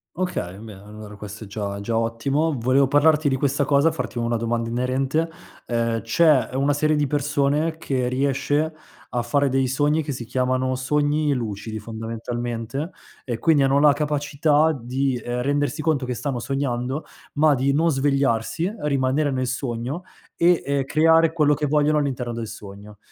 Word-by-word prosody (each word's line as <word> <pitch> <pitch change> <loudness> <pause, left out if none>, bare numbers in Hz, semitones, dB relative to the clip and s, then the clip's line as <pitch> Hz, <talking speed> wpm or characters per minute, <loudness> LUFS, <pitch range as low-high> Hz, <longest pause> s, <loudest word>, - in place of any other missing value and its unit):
Okay. 155 - -3
Beh, 110 -1 -10
allora 105 +1 -11
questo 105 +1 -9
è - - -12
già 100 0 -4
già 115 +3 -2
ottimo. 135 +7 0
Volevo 130 +3 +3
parlarti 150 +1 +4
di 130 - 0
questa 140 +1 +1
cosa, 140 +3 +3
farti 125 -5 -5
una 115 0 0
domanda 115 0 -1
inerente. 130 +6 0 0.4
Ehm, 115 -1 0
c'è 130 +1 +3
una 140 +2 +2
serie 155 +1 +1
di 145 - +1
persone 145 +2 0
che 130 -5 -1
riesce 140 +4 0 0.4
a 120 - +1
fare 140 +4 +1
dei 135 0 +1
sogni 145 +4 +1
che 145 - -4
si 125 -2 -5
chiamano 130 +2 0
sogni 145 +3 +1
lucidi 110 -3 -4
fondamentalmente, 115 - -5 0.3
e 120 -3 -3
quindi 150 +1 +4
hanno 135 +1 +3
la 145 0 +6
capacità 150 +1 +1
di, 130 +2 -1
ehm, 120 +1 -3
rendersi 145 +1 0
conto 150 -4 0
che 125 - -2
stanno 125 +1 -3
sognando 135 +1 -2 0.3
ma 150 0 +4
di 135 +2 +1
non 165 +3 +2
svegliarsi, 140 +2 +1
rimanere 140 0 +1
nel 130 -1 -1
sogno 130 +5 -3 0.3
e, 175 0 +3
ehm, 140 -1 0
creare 160 +3 +4
quello 150 -3 +3
che 150 +1 -1
vogliono 150 +1 +2
all'interno 125 -4 -2
del 115 -1 -4
sogno. 100 +1 -11
135 Hz, 165 wpm, -23 LUFS, 120-150 Hz, 0.4 s, la